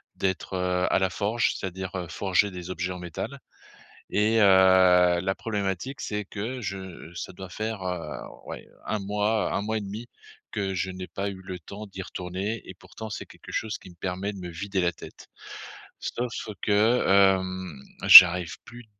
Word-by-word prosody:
d'être, 95 0 -2
heu, 90 0 0
à - - +3
la 95 0 +1
forge. 105 +5 0
C'est-à-dire, 95 -1 -5
heu, 90 -2 -4
forger 95 +2 +1
des 90 0 -8
objets 90 0 -3
en 90 - -8
métal 90 - -6 0.7
et 110 +2 +2
heu, 95 -3 +6
la 95 +1 -1
problématique, 105 +5 -3
c'est 105 0 -3
que 115 +6 -5
je 95 -5 -7
ça 85 - -6
doit 95 +1 -9
faire, 110 +2 -4
heu, 90 -4 -4 0.3
ouais, - - -8
heu, - - -25
1 110 - -1
mois, 105 +2 0
1 - - 0
mois 110 +1 -1
et - - -5
demi 105 +4 -7 0.5
que 100 -2 -2
je 95 +1 -2
n'ai 90 0 -7
pas 100 +1 -3
eu 95 -1 -9
le 95 -1 -7
temps 100 +6 -9
d'y 95 -1 -8
retourner 95 +5 -4
et - - -8
pourtant, 110 - -10
c'est - - -6
quelque - - -14
chose 110 -1 -3
qui - - -14
me 85 - -17
permet 95 +3 -3
de 100 - -10
me 90 -1 -7
vider 95 +4 -3
la 90 0 +1
tête. - - -13 0.7
Sauf 120 0 -4 0.3
que, 110 +4 +3
hem, 95 -5 +2 0.2
j'arrive 90 -2 +10
plus 120 +1 -12
95 Hz, 185 wpm, -26 LUFS, 90-105 Hz, 0.7 s, j'arrive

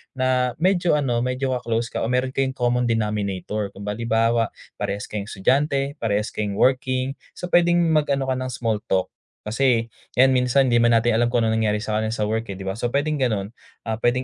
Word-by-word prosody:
na 130 -1 +1
medyo 175 0 +2
ano, 130 -5 0
medyo 125 +2 -1
ka-close 115 -1 -2
ka - - -3
o - - -1
meron 125 +2 0
kayong 130 0 -1
common 125 -1 +1
denominator. 105 -2 -2
Ku 100 - -9
halimbawa, 115 +2 +1 0.3
parehas 100 +1 -2
kayong 105 -1 -4
estudyante, 140 +7 0
parehas 105 0 -1
kayong 105 -2 -3
working, 130 +2 +1 0.2
so 180 - -7
pwedeng 175 0 +4
mag-ano 145 -3 +2
ka 130 -1 0
ng 130 0 -4
small 115 -3 -1
talk 95 -1 0 0.3
kasi 115 0 +1 0.2
'yan 130 +1 +5
minsan 125 +1 +3
'di 120 - +4
'man 120 0 +4
natin 115 +1 +3
alam 120 +2 +3
kung 120 -1 +1
anong 110 0 +1
nangyari 105 -1 0
sa 110 -1 -1
kanya 110 0 -1
sa 105 - -1
work, 110 +2 -1
eh, 100 - -5
'di 95 - -8
ba? 95 +3 -4
So 120 - 0
pwedeng 145 +4 -1
gano'n. 110 -6 -1 0.3
Ah, 110 0 -3
pwedeng 120 +2 +1
120 Hz, 200 wpm, -23 LUFS, 110-130 Hz, 0.3 s, yan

